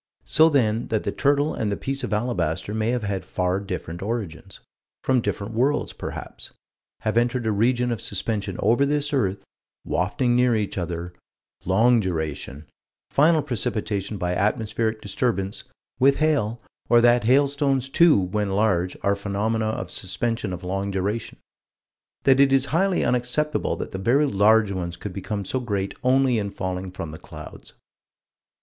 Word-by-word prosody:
So 160 +2 +5
then 115 -6 +1
that 110 -1 -1
the 100 - -1
turtle 145 +4 +1
and 105 -2 -2
the 100 - -1
piece 135 +1 -3
of - - -3
alabaster 105 -5 -1
may 110 +1 0
have 120 -2 -1
had 100 -3 -2
far 90 +1 -1
different 90 -3 -6
origins 100 -4 -5 0.4
from 130 -2 +2
different 105 0 -3
worlds, 135 +6 +1
perhaps - - -8 0.5
have 110 +1 -1
entered 120 0 +1
a 110 - +1
region 120 +4 +1
of 115 - -3
suspension 100 -1 -2
over 115 +7 +3
this 145 +1 0
earth 100 -8 0 0.4
wafting 120 +7 0
near 125 -1 +3
each 105 -2 -2
other 85 -1 -4 0.5
long 115 +6 +4
duration 80 -6 -3 0.5
final 155 +1 +4
precipitation 105 -5 -2
by 90 -1 -1
atmospheric 110 +2 0
disturbance 105 +2 -2 0.3
with 135 +1 +5
hail 140 -8 +1 0.3
or 120 - +6
that 120 0 +4
hailstones, 140 +1 +2
too, 155 -2 +5
when 100 +2 -1
large, 95 -3 +1
are 100 0 +2
phenomena 105 +3 -1
of 95 -5 -3
suspension 115 +2 -2
of 90 0 -6
long 95 +2 -2
duration: 100 +3 -3 0.9
that 135 -1 +5
it 140 -1 +5
is 135 -1 +4
highly 190 +2 +2
unacceptable 125 +5 0
that - - -6
the 95 - -5
very 125 +9 +3
large 105 -2 +4
ones 85 -3 -4
could 100 +1 -6
become 100 +1 -4
so 130 - -1
great 100 -5 -2
only 130 -2 +3
in 100 -1 -2
falling 95 -1 -4
from 85 -3 -6
the 80 - -9
clouds. - - -11
110 Hz, 155 wpm, -24 LUFS, 95-125 Hz, 0.9 s, or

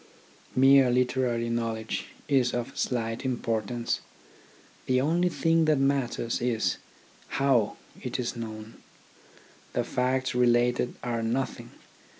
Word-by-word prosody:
Mere 135 0 +6
literary 125 -1 +1
knowledge 115 -1 -2 0.2
is 130 -4 +2
of 120 +2 -4
slight 115 -1 -2
importance. 115 -2 -1 0.9
The 130 0 +3
only 170 +6 +2
thing 165 -1 +2
that 155 -1 +3
matters 135 -4 0
is, 115 -8 0 0.6
how 130 -6 +2 0.2
it 125 0 -3
is 125 0 -2
known. 110 -1 -8 0.9
The - - +1
facts 130 +1 0
related 120 0 +2
are 120 -2 -1
nothing. 120 +4 -2
125 Hz, 110 wpm, -27 LUFS, 115-130 Hz, 0.9 s, Mere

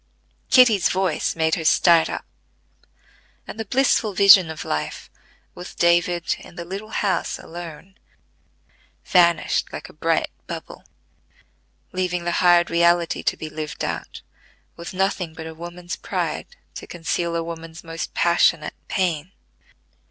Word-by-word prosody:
Kitty's 240 -7 +5
voice 185 -4 0
made 160 -1 +1
her 165 - 0
start 165 +1 +4
up, - - -5 1.2
and 220 - -9
the 225 - -3
blissful 225 -3 +1
vision 190 -3 +7
of 160 0 -6
life, 75 0 -4 0.4
with 180 +1 -10
David 170 0 +2
in - - -14
the 170 - -6
little 195 +5 -7
house 195 -4 -1
alone, 175 +4 -10 1.1
vanished 170 -2 +3
like - - -8
a - - -15
bright - - 0 0.2
bubble, - - -8 1.1
leaving 180 -1 -2
the 175 - -1
hard 175 -1 +5
reality 170 0 +2
to - - -1
be 155 - -6
lived 155 0 -5
out - - -6 0.5
with 170 +3 -8
nothing 185 -3 -1
but 160 - -8
a 160 - -7
woman's 175 +2 -7
pride - - -3 0.3
to - - -9
conceal 170 0 -2
a 165 - -1
woman's 165 0 -8
most 165 0 -6
passionate 170 -2 +2
pain. 175 -2 -1
175 Hz, 135 wpm, -22 LUFS, 165-185 Hz, 1.2 s, vision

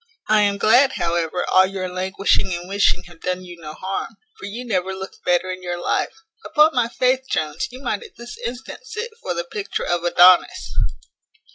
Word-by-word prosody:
I 215 0 +4
am 200 -1 +2
glad, 250 +6 +5
however, 170 +1 -1
all 185 0 +5
your 190 -1 -4
languishing 190 +1 0
and 175 +1 -7
wishing 195 -2 +2
have 175 -2 -16
done 180 0 -2
you 175 -2 -11
no 155 -1 -7
harm; 190 +6 -4 0.2
for - - -6
you 235 +5 -6
never 190 -4 -1
looked 190 0 -9
better 180 +1 +1
in 185 0 -6
your 175 -1 -4
life. 335 - -2 0.2
Upon 305 +2 +4
my 245 -2 +2
faith! 255 +2 +1
Jones, 155 0 -1
you 255 +2 -11
might - - -1
at 450 -5 -13
this 240 0 -9
instant 245 +2 -7
sit 460 +1 -5
for 175 - -3
the 170 - -2
picture 195 +4 -4
of 175 -1 0
Adonis." 175 - +5
190 Hz, 190 wpm, -21 LUFS, 175-235 Hz, 0.2 s, glad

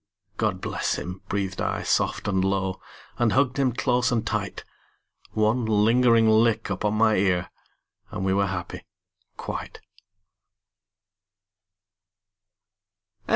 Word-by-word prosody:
"God - - -1
bless - - -1
him," 90 +1 -6
breathed 95 -2 -2
I - - -2
soft - - 0
and 95 -2 +1
low, 95 -1 -1 0.4
And 120 -3 +2
hugged 135 0 +2
him 130 -2 +2
close 125 0 +1
and 115 -2 0
tight. - - -3 0.7
One 110 +3 +1
lingering 115 +2 +4
lick 110 -1 +3
upon 105 +2 -1
my 110 0 +3
ear 90 -2 +1 0.6
And 95 - -4
we 95 - +2
were 100 0 +2
happy 90 -2 -6 0.5
quite. - - -6
110 Hz, 110 wpm, -25 LUFS, 95-120 Hz, 0.7 s, lingering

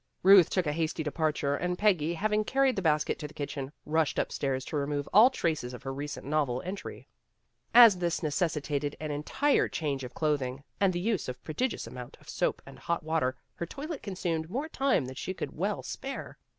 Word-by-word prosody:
Ruth 190 -2 +8
took 185 -2 +1
a 150 - 0
hasty 160 0 -1
departure 150 -2 0
and 180 +3 -2
Peggy, 175 -6 +2
hav 210 +5 -1
ing 215 0 +3
carried 270 +3 +2
the 195 - -1
basket 155 -3 +1
to 150 - -4
the 150 - -17
kitchen, 140 -1 -4
rushed 160 0 +1
upstairs 135 -1 -1
to - - -5
remove 145 0 -1
all 220 +5 +9
traces 155 - -2
of 125 - -12
her 135 0 -4
recent 145 +1 -5
novel 140 -4 0
entry. 190 +2 -6 0.6
As 230 -6 +9
this 175 -1 -1
necessitated 150 -2 -1
an 155 -1 -4
entire 155 - +1
change 140 -4 -2
of 125 - -8
clothing 140 -4 -1 0.2
and 195 -2 +4
the 175 - -2
use 195 - -1
of 125 - -3
a - - -36
prodigious 240 +11 -2
amount 125 -1 -9
of - - -16
soap - - -1
and - - -12
hot 170 -2 -2
water, 155 -5 0 0.2
her 170 - -5
toilet 295 - -6
consumed 170 -5 -3
more 270 - -2
time 275 - +1
than 130 - -6
she 185 +8 -5
could - - -5
well 195 +5 -1
spare. 270 0 -6
160 Hz, 205 wpm, -29 LUFS, 145-195 Hz, 0.6 s, all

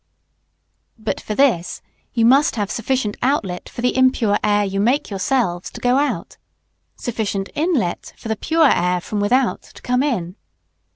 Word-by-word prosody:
But 220 -1 -3
for 215 - -4
this, 230 -11 +1 0.3
you 230 -2 +2
must 270 +5 +4
have 205 -3 -2
sufficient 230 -2 -1
outlet 200 -10 -1
for - - -7
the 250 - +1
impure 255 -5 +3
air 205 -1 +2
you 195 0 -2
make 245 +4 +1
yourselves 190 -3 0
to - - -10
go 250 +1 +2
out; 290 +1 -2 0.6
sufficient 210 -4 -3
inlet 295 - -1
for - - -9
the 220 - 0
pure 320 +7 +3
air 180 +1 +1
from 205 +4 -4
without 245 +5 +1
to - - -16
come 250 +1 +1
in. 215 -10 -2
225 Hz, 160 wpm, -20 LUFS, 200-260 Hz, 0.6 s, must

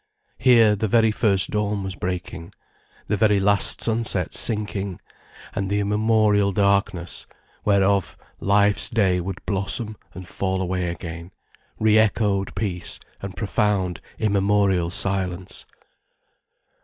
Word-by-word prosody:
Here, 115 -4 +5
the 110 +2 -1
very 110 +1 +3
first 100 -4 +1
dawn 105 -1 -1
was 95 -1 -4
breaking, 90 -2 -5 0.5
the 105 - 0
very 105 -1 +3
last 100 0 +3
sunset 110 -6 0
sinking, 105 -4 0 0.5
and 95 -1 -3
the 100 +1 0
immemorial 105 -1 +2
darkness, 100 -3 0 0.4
whereof 100 -1 +2 0.2
life's 100 +1 +2
day 95 -7 +1
would 95 +2 -7
blossom 100 +3 -2 0.2
and 90 -1 -9
fall 95 0 -2
away 90 -1 -2
again, 85 0 -7 0.5
re 110 0 +4
echoed 100 -2 0
peace 90 -5 -1 0.2
and 100 -1 -7
profound 100 -4 -1 0.2
immemorial 100 -4 +1
silence. 95 -1 -1
100 Hz, 115 wpm, -23 LUFS, 95-105 Hz, 0.5 s, Here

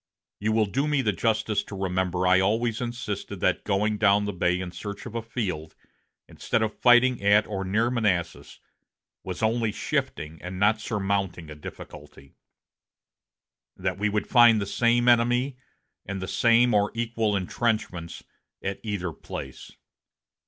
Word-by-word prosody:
You 105 +2 0
will 110 0 +3
do 135 +8 -1
me 145 -3 +1
the 105 - +2
justice 110 +1 0
to 100 - -8
remember 90 -1 -1
I 90 +1 +5
always 115 +4 0
insisted 120 -4 -5
that - - +1
going 105 +2 0
down 100 0 +4
the 105 - -3
bay 90 0 +1
in 90 -1 -5
search 100 +2 -7
of 115 - -8
a 115 - -2
field, 95 -9 -4 0.5
instead 110 - -1
of 110 - -4
fighting 120 0 +5
at 105 +2 +4
or 95 -2 -4
near 110 +6 +1
Manassas, 95 -9 -1 0.6
was 90 +2 -5
only 115 0 +1
shifting 80 -5 -3
and 90 +1 -6
not 105 +2 +3
surmounting 95 -6 -2
a - - -8
difficulty; 75 -2 -11 1.4
that 90 +1 -3
we 105 +1 +1
would 105 0 -1
find 120 -3 +6
the 100 - -2
same 120 +4 +2
enemy 120 +3 +3 0.5
and 100 0 -5
the 95 - -5
same 120 +3 +3
or 105 0 +3
equal 115 -2 0
intrenchments 95 -4 -2 0.4
at 100 0 -3
either 100 -6 -3
place. 65 -3 -8
105 Hz, 150 wpm, -26 LUFS, 95-115 Hz, 1.4 s, find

